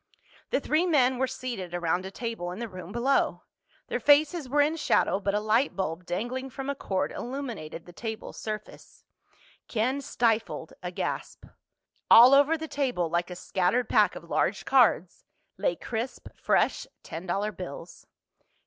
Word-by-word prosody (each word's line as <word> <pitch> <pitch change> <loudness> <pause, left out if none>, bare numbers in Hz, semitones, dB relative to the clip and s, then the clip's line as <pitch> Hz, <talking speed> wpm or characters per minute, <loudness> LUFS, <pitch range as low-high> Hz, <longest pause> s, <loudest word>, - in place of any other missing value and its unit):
The - - +1
three 310 +5 +1
men 260 -6 +3
were 260 - +2
seated 240 -9 -5
around 175 +2 -1
a - - -6
table 225 -3 -4
in 180 - -7
the 235 +1 -4
room 185 -2 -9
below. 245 +5 +1 0.4
Their - - -2
faces 295 0 +3
were 290 +2 +3
in 305 +2 0
shadow 250 -9 +2
but 200 0 -1
a - - +2
light 220 +6 +1
bulb 180 -2 -3
dangling 245 +8 -3
from 270 +2 -4
a - - -5
cord 190 -7 -2
illuminated 235 - -6
the 175 - -13
table's 220 +2 -6
surface. 215 -1 -7 0.6
Ken 255 +5 0
stifled 225 - -1
a 180 - -4
gasp. 175 - -4 0.6
All 245 +4 +9
over 285 +4 +5
the 320 0 -6
table, 255 - -1
like 175 +1 0
a 180 - -6
scattered 190 +7 0
pack - - +4
of - - -8
large - - -1
cards, 240 -9 +3 0.3
lay - - 0
crisp 235 +2 -5
fresh - - +1 0.2
ten 170 +3 -7
dollar 200 +4 -1
bills. 175 -3 -9
230 Hz, 160 wpm, -27 LUFS, 185-270 Hz, 0.6 s, All